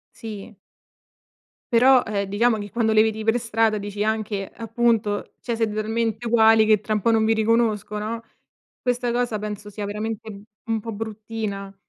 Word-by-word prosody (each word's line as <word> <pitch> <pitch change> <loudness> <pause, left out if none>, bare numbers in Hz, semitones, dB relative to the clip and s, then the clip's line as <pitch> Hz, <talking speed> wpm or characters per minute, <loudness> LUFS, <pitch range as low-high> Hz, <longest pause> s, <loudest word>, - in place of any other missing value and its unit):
Sì. 215 -2 -8 1.2
Però, 255 +2 +6
ehm, 200 -2 -1
diciamo 220 +3 +2
che 205 0 -6
quando 225 -1 +1
le 215 - +6
vedi 220 0 0
pre 225 +2 +2
strada 225 -1 +1
dici 205 +1 -3
anche 215 -2 -2
appunto 225 -3 0
cioè: 235 -2 -2
"Siete 225 -2 0
talmente 225 +1 -1
uguali 225 -1 +5
che 215 -2 +4
tra 215 +1 -3
un 210 - 0
po' 230 - +2
non 220 -1 +3
vi 225 - +3
riconosco" 220 -2 +1
no. 225 +2 -4 0.6
Questa 245 -1 0
cosa 240 -3 0
penso 210 0 -6
sia 205 0 -6
veramente, 220 +1 -4
mhmm, 200 0 -10 0.2
un 225 -1 0
po' 225 +1 -6
bruttina. 210 -2 -5
220 Hz, 170 wpm, -23 LUFS, 210-230 Hz, 1.2 s, Però